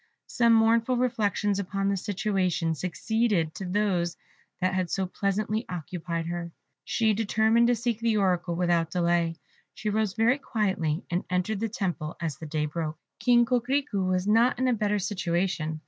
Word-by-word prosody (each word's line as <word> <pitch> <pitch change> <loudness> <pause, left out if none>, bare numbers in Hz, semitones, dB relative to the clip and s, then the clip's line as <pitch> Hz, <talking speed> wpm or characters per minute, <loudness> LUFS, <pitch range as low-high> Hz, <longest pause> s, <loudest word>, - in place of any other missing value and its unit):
Some 235 -2 +3
mournful 230 +2 +3
reflections 210 -4 0
upon 195 0 -2
this 200 -2 -1
situation 190 -5 0
succeeded 185 0 0
to 190 - -6
those 180 -3 0 0.4
that 185 0 +1
had 185 -2 -1
so 190 -1 0
pleasantly 210 +4 -1
occupied 170 -1 -4
her. 170 0 -4 0.3
She 220 -2 +1
determined 220 +2 +3
to 245 - +3
seek 235 -1 -2
the 230 -2 +1
Oracle 180 -3 +1
without 170 -2 +1
delay. 170 -1 +1 0.4
She 215 - -2
arose 215 -2 0
very 235 +5 +2
quietly, 190 - -1
and 175 +1 0
entered 185 +3 0
the 225 +1 -1
temple 175 -7 -3
as 165 -4 -3
the 160 - -7
day 150 0 -1
broke. 155 0 -4 0.2
King 240 -1 +4
Coquerico 250 -3 0
was 185 0 0
not 225 +4 +3
in 260 - +1
a 250 - +3
better 210 -2 0
situation. 175 -5 -1
195 Hz, 160 wpm, -27 LUFS, 175-225 Hz, 0.4 s, King